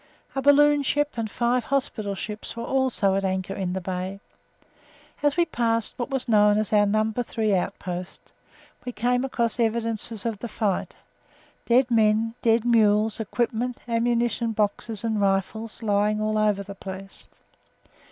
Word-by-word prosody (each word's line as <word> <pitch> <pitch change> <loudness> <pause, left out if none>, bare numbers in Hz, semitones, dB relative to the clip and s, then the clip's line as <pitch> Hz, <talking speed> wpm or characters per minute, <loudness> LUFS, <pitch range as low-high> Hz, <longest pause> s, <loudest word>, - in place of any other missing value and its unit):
A 270 - -1
balloon 290 +1 +5
ship 290 +1 0
and 225 -2 -3
five 240 +2 0
hospital 225 -7 -1
ships 210 +3 -6
were 235 - -4
also 260 -7 +1
at 195 0 0
anchor 190 0 -2
in 190 -2 -3
the 190 - -2
bay. 185 +2 -4 1.0
As 290 +1 +1
we 345 - +4
passed 230 -7 0
what 240 - -2
was 270 -2 -2
known 210 -2 +4
as 215 0 -1
our 205 -1 +5
No. 215 +2 +1
3 220 -3 -1
Outpost, 180 -1 -4 0.5
we 245 - -5
came 245 +3 +1
across 235 -3 -1
evidences 230 -1 -1
of 225 -3 -2
the 240 - -5
fight 210 -3 -2 0.7
dead 250 +1 +3
men, 220 0 +3
dead 230 0 +3
mules, 215 -2 +3
equipment, 235 +2 -2
ammunition 235 0 0
boxes 210 +1 -2
and 220 -2 0
rifles 205 +4 -1
lying 210 0 +1
all 215 0 0
over 210 -2 +1
the 200 0 -8
place. 195 0 -9
220 Hz, 150 wpm, -25 LUFS, 205-240 Hz, 1.0 s, balloon